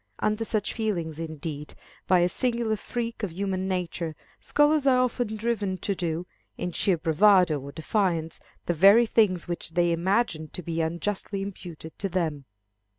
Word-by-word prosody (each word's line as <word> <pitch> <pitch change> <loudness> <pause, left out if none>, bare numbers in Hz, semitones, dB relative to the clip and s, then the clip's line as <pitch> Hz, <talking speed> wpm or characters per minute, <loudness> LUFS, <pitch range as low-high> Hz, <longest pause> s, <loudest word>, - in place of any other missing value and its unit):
Under 215 +1 0
such 215 -2 -1
feelings, 170 -9 -2
indeed, 155 -2 -6 0.3
by 185 -2 +5
a 175 - +4
singular 235 +2 0
freak 230 +2 -4
of 205 -5 -2
human 190 +1 -2
nature, 175 -3 -3 0.2
scholars 295 -1 +3
are 260 -2 +5
often 245 -3 0
driven 210 -4 -1
to 200 - -1
do, 175 -2 -3 0.3
in 180 - -3
sheer 180 +1 +1
bravado 170 0 +4
or 140 +1 -8
defiance, 165 -1 -1 0.3
the 175 - +1
very 200 +8 +7
things 210 -6 +2
which 170 -1 -4
they 175 -1 +3
imagine 170 -1 0
to 180 - -5
be 165 0 -2
unjustly 195 +4 -2
imputed 175 -5 -9
to 195 - -2
them. 160 -6 -2
185 Hz, 155 wpm, -26 LUFS, 165-215 Hz, 0.3 s, very